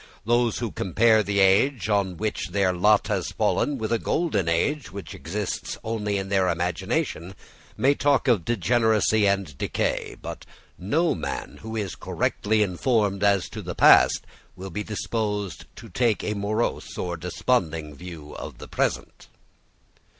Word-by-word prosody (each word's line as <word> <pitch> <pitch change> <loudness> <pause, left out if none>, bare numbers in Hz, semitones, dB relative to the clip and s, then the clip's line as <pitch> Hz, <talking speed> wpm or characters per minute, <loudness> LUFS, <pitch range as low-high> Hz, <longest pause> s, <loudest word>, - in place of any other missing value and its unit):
Those 120 0 +2
who 115 -4 -3
compare 110 +4 +3
the 100 0 -1
age 105 +7 +3
on 100 -4 0
which 110 +3 -2
their 100 -2 +1
lot 105 +4 +4
has - - -1
fallen 145 -1 +1
with 110 -2 -3
a 115 - +1
golden 105 - 0
age 135 - 0
which 95 -3 -8
exists 95 +7 -4
only 105 -2 -2
in 95 0 -4
their 95 -2 +2
imagination 85 +1 -2 0.4
may 135 +2 +4
talk 145 -1 +2
of 115 -9 +3
degeneracy 110 0 +2
and 100 -7 0
decay: - - -1
but - - -7 0.4
no 155 - +1
man 80 - -5
who 110 0 -6
is 100 -5 -2
correctly 110 +1 0
informed 105 +1 0
as 100 -2 +3
to - - -7
the - - -6
past - - +6 0.3
will 95 +1 -8
be 105 - -3
disposed 105 -3 -3
to 115 - -11
take 115 +2 0
a 105 - -1
morose 105 +3 -2
or 90 -1 -2
desponding 80 -3 -1
view 80 -1 -10
of - - -8
the - - -10
present. - - -2
105 Hz, 150 wpm, -25 LUFS, 90-115 Hz, 0.4 s, past